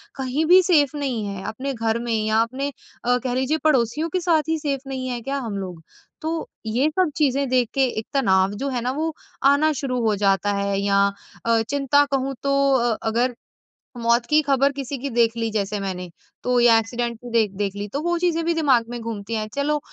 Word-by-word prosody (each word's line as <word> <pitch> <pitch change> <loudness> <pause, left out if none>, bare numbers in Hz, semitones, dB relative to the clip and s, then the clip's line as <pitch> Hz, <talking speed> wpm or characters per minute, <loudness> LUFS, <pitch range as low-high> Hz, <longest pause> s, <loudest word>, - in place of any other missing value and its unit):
कहीं 270 +4 -1
भी 365 +3 +7
सेफ 300 -5 +3
नहीं 260 -7 -2
हैं 195 -1 -6
अपने 270 +5 -4
घर 225 -1 -1
में 235 -1 -2
या 220 +1 +3
अपने 265 +5 -2 0.3
अ, 245 0 +3
कह 250 -1 -1
लीजिए 265 +5 +1
पड़ोसियों 300 +2 +2
के 365 +2 -1
साथ 330 -3 +2
ही 320 -1 +1
सेफ़ 275 -2 -3
नहीं 260 -1 -4
है 240 -1 -3
क्या 275 +3 -3
हम 220 -6 -4
लोग? 180 -4 -7 0.4
तो 315 - -2 0.4
ये 245 +7 +1
सब 360 +1 +1
चीज़ें 280 -2 +1
देख 250 -3 +2
के 270 -1 +2 0.2
एक 220 - -7
तनाव 190 -7 +3
जो 280 - -1
है 250 -3 -2
ना 250 - -1
वो 315 +3 -2 0.3
आना 285 +3 +5
शुरू 255 -2 -1
हो 215 -2 +2
जाता 200 0 +2
है 200 0 -1
या 200 0 +3 0.4
अ, 230 -1 +3
चिंता 285 +1 +3
कहूँ 270 0 -1
तो 275 - +1 0.2
अ, 240 -3 +1
अगर 240 +2 +1 0.6
मौत 235 0 +2
की 305 0 +5
खबर 275 0 +3
किसी 275 0 -5
की 275 +2 -4
देख 230 -1 +2
ली 230 -1 -1
जैसे 205 -1 -1
मैंने 180 -2 -4 0.3
तो 250 -1 +2
या 235 -1 +6
एक्सीडेंट 235 +1 -3
की 245 0 -9
देख 220 -4 +2
देख 200 -1 -2
ली 205 0 -4
तो 285 - -1
वो 345 0 +1
चीज़ें 335 -2 +1
भी 340 - +2
दिमाग 270 -8 +3
में 240 0 -5
घूमती 225 -1 -5
हैं। 215 -1 -2
चलो 295 +1 0
250 Hz, 215 wpm, -23 LUFS, 225-280 Hz, 0.6 s, भी